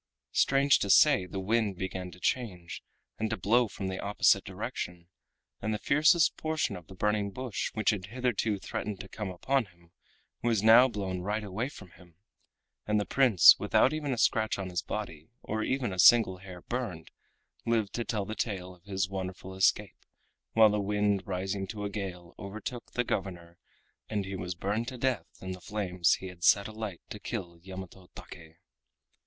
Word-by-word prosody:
Strange 140 0 +4
to 100 - -2
say 135 -4 +5
the 95 +2 -5
wind 105 0 0
began 95 0 -4
to 90 - -14
change 90 -8 -2 0.4
and 110 - -1
to - - -2
blow 115 +6 +3
from 100 -1 -7
the 95 0 -4
opposite 100 +1 +3
direction, 85 -1 -6 0.5
and 110 +1 -1
the - - -2
fiercest 155 - +4
portion 155 -9 -1
of 90 -3 -11
the 95 - -12
burning 105 +1 0
bush 125 0 -4
which 110 +1 +2
had 95 -3 -4
hitherto 115 -2 -1
threatened 100 +1 -5
to - - -8
come 105 0 -5
upon 130 +8 0
him 85 -3 -24 0.5
was 115 -4 +1
now 115 +3 +8
blown 95 -6 -4
right 105 +4 -2
away 105 +6 -3
from 95 -10 -13
him, 85 -2 -19 0.7
and 105 0 +2
the 105 - -1
Prince, 125 -10 +7
without 135 - +3
even 150 -2 -2
a 125 - -1
scratch 110 -1 +2
on 95 -2 -5
his 90 -2 -1
body 80 -6 -6
or 110 +1 -3
a 120 -9 -2
single 105 -3 +6
hair 90 -2 -11
burned, 115 -10 -5 0.6
lived 110 -4 +1
to 120 - -2
tell 105 -4 -2
the 110 - -5
tale 95 -5 -3
of 90 -1 -22
his 95 -1 -1
wonderful 95 -1 -6
escape, 95 +1 +1 0.5
while 110 -1 +7
the 105 0 0
wind 105 0 +1
rising 95 +1 -3
to 105 0 -5
a 100 - -3
gale 90 -4 -6
overtook 110 +5 -7
the 125 - +1
governor, 85 -6 -4 0.5
and 105 -2 -2
he 95 0 -5
was 90 -1 -4
burned 105 +6 -2
to 130 -1 -6
death 130 0 -1
in 95 - -5
the 90 0 -7
flames 90 -5 +1
he - - -10
had 90 -2 -10
set 100 +2 +5
alight 110 -4 -6
to 105 - -6
kill 90 -7 -6
Yamato 95 0 -10
Take. 80 -2 -12
100 Hz, 180 wpm, -29 LUFS, 95-110 Hz, 0.7 s, now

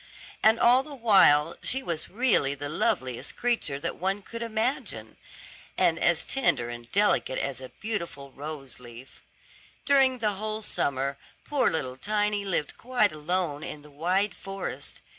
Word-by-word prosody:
And 220 +1 +5
all 245 +2 +6
the 290 +1 -10
while 180 - +5
she 265 +1 0
was 165 -6 -2
really 205 - +2
the 145 +1 -5
loveliest 130 -5 -1
creature 235 -13 0
that - - -3
one 195 +3 -1
could 230 +3 -8
imagine, 230 +3 -2 0.6
and - - +3
as - - +2
tender 190 - +1
and 120 0 -9
delicate 205 -9 +2
as 135 -2 -3
a 130 - -8
beautiful 170 -10 -5
rose 140 -2 -7
leaf. 120 +1 -13 0.6
During 270 -2 +4
the 215 -3 0
whole 215 +2 -4
summer 140 -5 -1 0.3
poor 280 -4 +2
little 130 -5 -3
Tiny 210 +5 0
lived 175 -7 -2
quite 245 -4 +2
alone 155 -1 -2
in 150 - -7
the 150 - -15
wide 180 +7 0
forest. 195 0 -7
185 Hz, 150 wpm, -27 LUFS, 140-220 Hz, 0.6 s, all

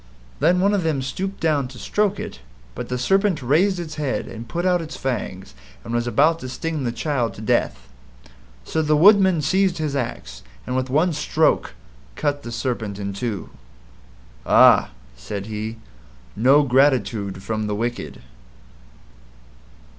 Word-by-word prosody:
Then 180 +1 +3
one 200 +2 +3
of 200 - +1
them 155 -5 -1
stooped 190 +9 -4
down 150 -5 +1
to 125 0 -12
stroke 205 - 0
it, - - -7 0.3
but - - -6
the 125 - -2
Serpent 195 +3 +1
raised 175 +9 +2
its 155 -2 -6
head 140 -3 -1
and 115 +1 -8
put 175 +6 -2
out 180 -1 +2
its 160 +2 -7
fangs 105 - -4 0.3
and 115 - -6
was 120 0 0
about 155 +7 +3
to 130 - -7
sting 155 +2 -3
the 120 - 0
child 125 -3 -2
to - - -9
death. 65 - 0 0.8
So 160 - -1
the 150 -1 +2
Woodman 190 -2 +5
seized 190 +2 +2
his 155 -3 -2
axe, 90 - -4 0.2
and 125 - -3
with 130 0 -1
one 160 +6 +2
stroke 150 - +1 0.4
cut 145 -1 -1
the 120 - -8
Serpent 115 -4 -3
in 100 -1 -4
two. 105 -2 -4 0.9
"Ah," - - +6 0.3
said 65 +12 -6
he, 110 +1 -5 0.6
"NO 135 +6 +5
GRATITUDE 125 -8 +1
FROM 110 +1 -2
THE 105 - -2
WICKED." 120 +3 -4
135 Hz, 155 wpm, -22 LUFS, 115-165 Hz, 0.9 s, Ah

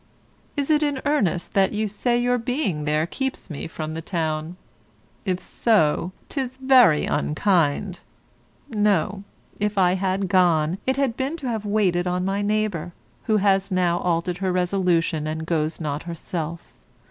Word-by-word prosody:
Is 285 +1 0
it 300 0 +4
in 290 -3 0
earnest 205 - 0
that 195 +1 +3
you 215 +1 0
say 240 +4 0
your 245 +1 +1
being 225 - -1
there 155 +1 +1
keeps 265 0 -4
me 150 - -5
from 155 -1 -5
the 160 +1 -5
town? 160 0 -3 0.7
If 185 -1 0
so, 180 -7 +1 0.2
'tis 260 -2 -4
very 260 - +5
unkind. 170 +3 +1 0.7
No, 205 -3 +1 0.4
if 210 0 -1
I 180 -2 +4
had 190 +1 0
gone, 175 -2 +3
it 260 0 +1
had 270 -5 +1
been 275 +6 -2
to 280 -5 -6
have 220 -3 -2
waited 190 -4 +1
on 180 +1 -1
my 195 +1 0
neighbour, 205 -5 -1 0.3
who 215 -2 +3
has 195 -1 +2
now 180 -2 +1
altered 175 +1 -1
her 190 -1 0
resolution 180 -4 +1
and 160 +1 -3
goes 160 -1 -1
not 150 -2 -3
herself. 170 0 -5
185 Hz, 155 wpm, -23 LUFS, 165-215 Hz, 0.7 s, very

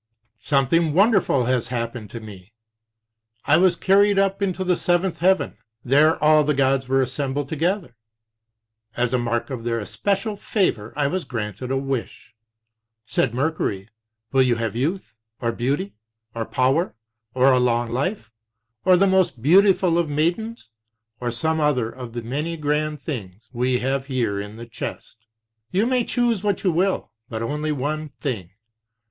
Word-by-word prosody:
"Something 145 +4 +2
wonderful 195 - +4
has 125 -2 0
happened 115 -3 -4
to 115 - -7
me. 105 -2 -12 0.9
I 150 - +5
was 180 0 +4
carried 200 +2 +3
up 195 0 +1
into 190 -1 -1
the 180 -1 +2
seventh 175 +1 0
heaven. 185 - +2 0.3
There 150 +5 +4
all 155 0 +6
the 150 0 +1
gods 135 -1 +2
were 135 0 +3
assembled 135 +2 -2
together. 165 - -1 1.0
As 125 0 0
a 125 - +2
mark 120 +2 -2
of 125 -3 -5
their 115 0 -1
especial 195 - -2
favor 150 - -1
I 145 - +1
was 180 +5 -1
granted 110 +1 -5
a 135 - 0
wish. 135 -3 -4 0.7
Said 115 - 0
Mercury: 125 -9 -1 0.4
Will 135 - +4
you 125 -2 +3
have 115 -2 -3
youth, 150 +1 -2 0.2
or 115 -1 0
beauty, 140 - -2 0.4
or 115 -1 -3
power, 135 +6 +1 0.4
or 130 +1 +5
a 130 - +4
long 120 -1 +1
life, 135 - -2 0.5
or 185 -1 +5
the 195 - +4
most 190 -11 +2
beautiful 185 +1 +5
of 170 -3 0
maidens, 175 - -1 0.5
or 120 - -2
some 160 +7 0
other 125 -6 +1
of 125 -3 -9
the 120 -1 -5
many 150 +8 -3
grand 150 0 -1
things 115 - -7
we 125 +1 +1
have 135 +2 -2
here 120 -7 -1
in 105 +1 -8
the 115 +1 -9
chest? 110 -1 -8 0.4
You 200 +4 +1
may 250 0 +2
choose 235 -4 0
what 205 -3 0
you 185 - +3
will, 185 +4 0 0.2
but 110 0 -4
only 150 +5 -2
one 150 +2 -2
thing. 110 - -3
140 Hz, 160 wpm, -23 LUFS, 120-175 Hz, 1.0 s, all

